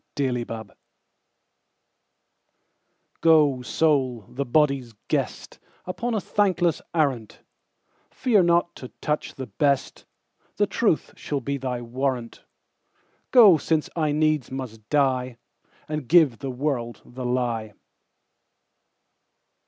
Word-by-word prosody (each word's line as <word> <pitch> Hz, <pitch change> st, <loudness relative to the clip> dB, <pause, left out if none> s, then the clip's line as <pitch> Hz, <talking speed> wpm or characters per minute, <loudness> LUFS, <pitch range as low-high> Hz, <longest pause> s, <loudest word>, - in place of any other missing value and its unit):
The 140 Hz, -3 st, 0 dB
Lie 115 Hz, -2 st, -4 dB, 2.6 s
GO, 150 Hz, -5 st, +4 dB
Soul, 130 Hz, -4 st, +1 dB
the 140 Hz, +2 st, -3 dB
body's 135 Hz, -3 st, +1 dB, 0.2 s
guest, -, -, -3 dB, 0.3 s
Upon 230 Hz, +6 st, -3 dB
a -, -, +1 dB
thankless 185 Hz, -5 st, +1 dB
arrant:Fear 155 Hz, -, -2 dB
not 170 Hz, 0 st, +2 dB
to 130 Hz, -, -8 dB
touch 150 Hz, 0 st, -2 dB
the 130 Hz, -, -6 dB
best; 140 Hz, +5 st, -1 dB, 0.5 s
The -, -, +3 dB
truth -, -, 0 dB
shall 145 Hz, -, -3 dB
be 140 Hz, +1 st, -3 dB
thy 125 Hz, -2 st, -4 dB
warrant:Go, 135 Hz, -, 0 dB
since 155 Hz, +2 st, -1 dB
I 155 Hz, -3 st, +1 dB
needs 155 Hz, -3 st, +1 dB
must 115 Hz, -5 st, -7 dB
die, 130 Hz, -4 st, +1 dB, 0.5 s
And 150 Hz, -4 st, -4 dB
give 155 Hz, -8 st, +5 dB
the 135 Hz, -, -4 dB
world 125 Hz, -4 st, -3 dB
the 130 Hz, +1 st, -8 dB
lie. 120 Hz, -3 st, -1 dB
140 Hz, 100 wpm, -24 LUFS, 125-155 Hz, 2.6 s, give